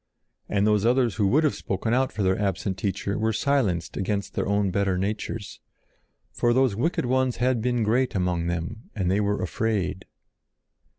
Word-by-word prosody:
And 100 0 +2
those 105 -1 +3
others 120 -2 +2
who 105 -3 +3
would 150 +10 +3
have 150 - +2
spoken 110 +4 -2
out 130 +1 +2
for 105 - -2
their 95 0 +3
absent 100 0 -1
Teacher 100 +1 -2
were 110 +1 +1
silenced 110 -8 0
against 100 +1 -2
their - - -1
own 100 -1 +1
better 95 -1 +1
natures. 105 +2 -4 0.7
For 120 0 +1
those 130 -4 +3
wicked 130 - 0
ones 130 0 +1
had 125 -1 +1
been 120 0 +1
great 120 +3 +1
among 90 -2 0
them, 85 +7 -4
and 95 -4 0
they 100 - +2
were 105 -1 0
afraid. 95 0 -1
105 Hz, 175 wpm, -25 LUFS, 95-120 Hz, 0.7 s, those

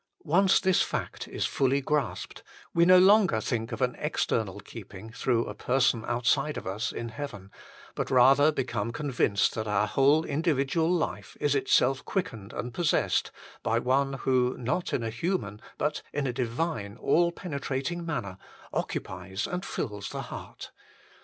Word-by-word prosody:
Once 185 +5 +4
this 190 -2 +3
fact - - -3
is - - -2
fully 135 +1 +1
grasped, 140 -2 -2 0.3
we 170 0 +4
no 185 +1 +8
longer 190 - +5
think 115 +1 -2
of - - -2
an 125 -1 0
external 110 -9 -1
keeping 100 0 -10
through 120 -1 0
a - - -5
person 125 +1 +1
outside 130 +5 +1
of - - -6
us 105 +7 -2
in 115 0 -5
heaven, 110 -7 -7 0.4
but - - -3
rather 135 +4 +6
become 120 -6 -2
convinced 120 -7 +1
that 110 -1 -3
our 105 0 +2
whole 140 +8 +3
individual 155 +1 +1
life 175 -3 -2
is 145 - +2
itself 135 0 +2
quickened 115 - -3
and 120 0 -5
possessed 170 +2 +1 0.3
by 115 - +1
One 135 +3 +1
who, 130 -1 +1
not 130 +9 -2
in 120 - -1
a 115 - -2
human 115 - -2 0.2
but 150 +1 -1
in 145 -1 -2
a 125 - -1
divine, 120 -3 -2
all 170 +6 +3
penetrating 140 -1 -3
manner, 100 - -4 0.3
occupies 95 +2 -3
and 180 +1 -3
fills 105 - -4
the - - -4
heart. - - -9
130 Hz, 155 wpm, -28 LUFS, 115-150 Hz, 0.4 s, no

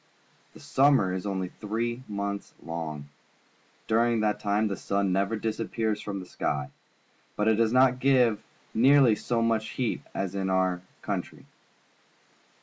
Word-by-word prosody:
The - - -12
summer 135 -9 +3
is 95 +2 -3
only 95 -2 -2
three 115 +5 -3
months 100 -1 -4
long. 80 -3 -5 0.8
During 115 0 +2
that 105 -1 0
time 105 +1 +1
the 100 - -2
sun 100 -1 -1
never 100 +4 +1
disappears 110 0 -2
from 100 -2 -4
the 90 - -8
sky, 70 -5 -3 0.6
but 105 - 0
it 110 - +5
does 115 -1 +2
not 130 0 +4
give 125 -5 +3 0.3
nearly 130 0 +6
so 115 +2 -1
much 110 -1 0
heat 125 -3 -2
as 95 -1 -2
in 95 -1 -2
our 95 -1 +1 0.2
countrj'. - - -4
105 Hz, 145 wpm, -27 LUFS, 95-115 Hz, 0.8 s, nearly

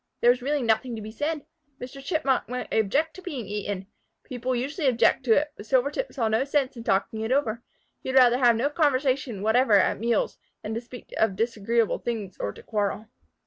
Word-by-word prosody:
There 240 - +6
was 245 +1 -1
really 285 +1 0
nothing 230 +2 +1
to 220 - -6
be 215 - -7
said. 295 +5 -3 0.3
Mr. 270 +2 -8
Chipmunk 275 - 0
might 250 0 -4
object 275 +10 +1
to 375 - -10
being 285 - -5
eaten. 205 -2 -4 0.4
People 255 0 -3
usually 280 +5 -1
did 255 - +3
object 245 - +3
to 230 - +5
it, 295 +4 +1
but 205 - -11
Silvertip 280 - +1
saw 235 -5 -1
no 220 +3 +2
sense 275 -1 0
in 230 - -8
talking 220 +2 0
it 220 +2 -2
over. 240 -4 +1 0.4
He - - -6
would 260 - +2
rather 250 -1 +6
have 240 -3 +5
no 265 +6 0
conversation 265 - +1
whatever 225 +2 +3
at 195 -1 +4
meals 230 0 0 0.2
than 215 - -4
to 230 - -3
speak 245 0 -12
of 220 -3 +2
disagreeable 230 +1 0
things 215 -6 -4
or 100 - -2
to - - -14
quarrel. 210 0 -2
245 Hz, 210 wpm, -26 LUFS, 220-270 Hz, 0.4 s, There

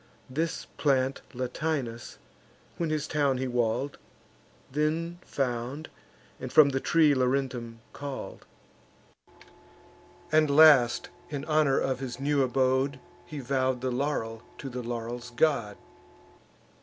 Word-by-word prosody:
This 160 +4 -2
plant 135 -2 +1
Latinus, 125 -1 -3 0.6
when 170 -2 -1
his 155 -1 -1
town 145 -4 +1
he 130 +1 -2
wall'd, 120 +3 -1 0.7
Then 160 +4 -1
found, 130 +3 -3 0.5
and 130 -1 -6
from 140 +1 +7
the 135 -1 0
tree 155 0 +4
Laurentum 125 -3 -1
call'd; 140 -2 -7 1.9
And 155 -1 +4
last, 140 -5 +6 0.2
in 145 -1 -4
honour 155 -3 +3
of 130 -1 -1
his 130 -2 -5
new 140 0 +1
abode, 130 +1 +1 0.3
He 150 -4 -6
vow'd 130 -1 0
the 130 0 -1
laurel 120 -4 -2 0.2
to 135 - -6
the 125 0 -4
laurel's 120 +1 -5
god. 120 -5 +1
135 Hz, 115 wpm, -28 LUFS, 125-150 Hz, 1.9 s, from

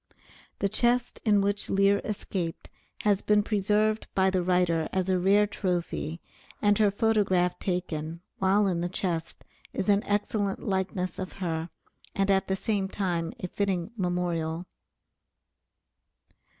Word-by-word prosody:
The 200 - +1
chest 240 +4 +1
in 205 -2 +4
which 205 +1 -1
Lear 195 +1 +3
escaped 185 -5 -4 0.3
has 205 -2 +3
been 210 0 +3
preserved 215 +1 +1
by 190 0 +3
the 185 -1 +1
writer 175 -2 +1
as 190 0 0
a 185 -1 +2
rare 200 +3 +4
trophy, 175 -5 -2 0.4
and 205 -1 +4
her 210 -2 +5
photograph 200 -4 +2
taken, 170 -3 -3 0.2
while 195 +2 +3
in 180 -3 0
the 175 - -1
chest, 170 -3 -3 0.3
is 200 - -2
an 200 0 +4
excellent 205 -1 -1
likeness 185 -2 -1
of 185 -1 -5
her 165 -3 -3 0.5
and, 195 +1 +2
at 195 0 +2
the 190 - +1
same 200 -1 -1
time, 175 -5 -1
a 180 - -2
fitting 190 -1 -1
memorial. 175 -3 -1
190 Hz, 135 wpm, -28 LUFS, 175-205 Hz, 0.5 s, her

